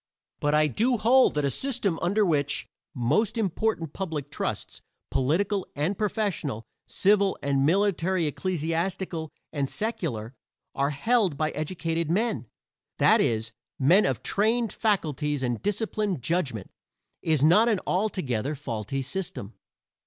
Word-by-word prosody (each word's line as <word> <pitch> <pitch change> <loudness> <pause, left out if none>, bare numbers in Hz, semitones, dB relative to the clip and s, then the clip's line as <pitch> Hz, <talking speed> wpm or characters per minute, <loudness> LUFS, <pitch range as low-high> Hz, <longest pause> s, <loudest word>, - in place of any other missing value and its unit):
But 145 +1 +1
I 155 0 +5
do 235 - +1
hold 245 +2 +4
that 150 -1 +1
a 140 - +1
system 225 - -1
under 205 +4 +2
which 145 -5 0 0.3
most 140 - +1
important 195 -5 -1
public 155 -7 -4
trusts, - - -4 0.3
political 185 +9 +1
and 155 +8 0
professional, 190 - -2 0.2
civil 200 -1 +3
and 140 0 +2
military 185 -1 +2
ecclesiastical 165 +1 -2 0.2
and 140 -3 -1
secular, 140 - -3 0.4
are 140 +1 +1
held 185 - +1
by 155 0 0
educated 165 +1 -2
men 210 - 0 0.5
that - - +5
is, 115 0 0 0.3
men 170 +10 +5
of - - -2
trained 225 +2 +1
faculties 150 - 0
and 120 -3 -1
disciplined 205 - -1
judgment 135 - -1 0.5
is 155 -4 +1
not 210 +9 +6
an 215 -4 +2
altogether 155 - -1
faulty 125 -1 -4
system. 140 - -5
165 Hz, 125 wpm, -26 LUFS, 140-205 Hz, 0.5 s, not